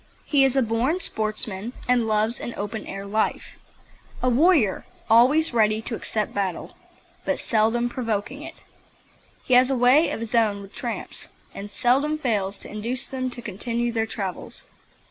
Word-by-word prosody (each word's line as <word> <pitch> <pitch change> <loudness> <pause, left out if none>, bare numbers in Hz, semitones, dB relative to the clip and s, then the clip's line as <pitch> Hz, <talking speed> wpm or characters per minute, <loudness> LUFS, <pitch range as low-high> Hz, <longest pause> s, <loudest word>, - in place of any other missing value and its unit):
He 285 -3 +3
is 270 -1 +3
a 265 - +3
born 235 +10 0
sportsman 215 - -1
and 245 -2 +3
loves 215 +2 +1
an 240 - -5
open 210 +1 -5
air 195 0 -6
life 215 +2 -2 0.6
a 255 - +3
warrior, 275 - +3 0.3
always 260 +7 +5
ready 215 -2 +3
to 235 - -5
accept 215 -1 -2
battle, 190 -4 -3 0.5
but - - -1
seldom 225 +2 +2
provoking 240 +2 -3
it. 330 +1 -10 0.8
He 255 - 0
has 250 +1 +6
a 270 - +1
way 255 +7 +5
of - - -3
his 230 0 -4
own 210 -4 +2
with 195 - -14
tramps, 235 -2 -5 0.2
and 200 +1 -7
seldom 265 +7 +2
fails 205 -8 -1
to - - -6
induce 235 +5 -2
them 255 -1 -3
to 240 -1 -8
continue 235 +4 -2
their 225 -1 -1
travels. 195 -4 -5
230 Hz, 165 wpm, -24 LUFS, 215-255 Hz, 0.8 s, has